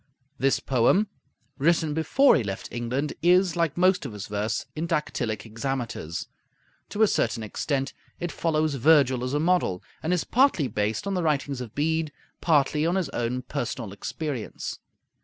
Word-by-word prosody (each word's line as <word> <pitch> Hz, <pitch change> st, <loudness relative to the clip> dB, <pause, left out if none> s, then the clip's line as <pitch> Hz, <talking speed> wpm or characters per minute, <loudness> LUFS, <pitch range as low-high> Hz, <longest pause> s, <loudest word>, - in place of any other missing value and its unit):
This 135 Hz, +1 st, +2 dB
poem, 135 Hz, -, +2 dB, 0.5 s
written 160 Hz, +1 st, +2 dB
before 160 Hz, -, +4 dB
he 145 Hz, -, +2 dB
left 95 Hz, -1 st, -5 dB
England, 125 Hz, +5 st, -2 dB
is, 180 Hz, 0 st, +4 dB
like 170 Hz, -3 st, 0 dB
most 185 Hz, 0 st, +3 dB
of 135 Hz, -6 st, -6 dB
his 105 Hz, -1 st, -6 dB
verse, 105 Hz, +2 st, -2 dB
in 160 Hz, +2 st, -2 dB
dactylic 150 Hz, -9 st, -1 dB
hexameters. 115 Hz, -, -4 dB, 0.6 s
To 215 Hz, -, +2 dB
a -, -, +6 dB
certain 115 Hz, -, 0 dB
extent 135 Hz, +5 st, -2 dB, 0.3 s
it 175 Hz, -1 st, -3 dB
follows 155 Hz, -2 st, 0 dB
Virgil 135 Hz, -2 st, +4 dB
as 130 Hz, +3 st, -2 dB
a -, -, +2 dB
model, 165 Hz, -, +1 dB, 0.2 s
and 160 Hz, -, -1 dB
is 180 Hz, -2 st, +1 dB
partly 250 Hz, -, +3 dB
based 105 Hz, -, -1 dB
on 200 Hz, -, -1 dB
the 180 Hz, -, 0 dB
writings 140 Hz, -4 st, 0 dB
of 115 Hz, -4 st, -8 dB
Bede, 160 Hz, +1 st, 0 dB, 0.3 s
partly 150 Hz, -2 st, +3 dB
on 170 Hz, +3 st, +1 dB
his 185 Hz, -7 st, 0 dB
own 125 Hz, 0 st, -2 dB
personal 120 Hz, -5 st, -4 dB
experience. 130 Hz, +3 st, -5 dB
145 Hz, 160 wpm, -26 LUFS, 120-165 Hz, 0.6 s, a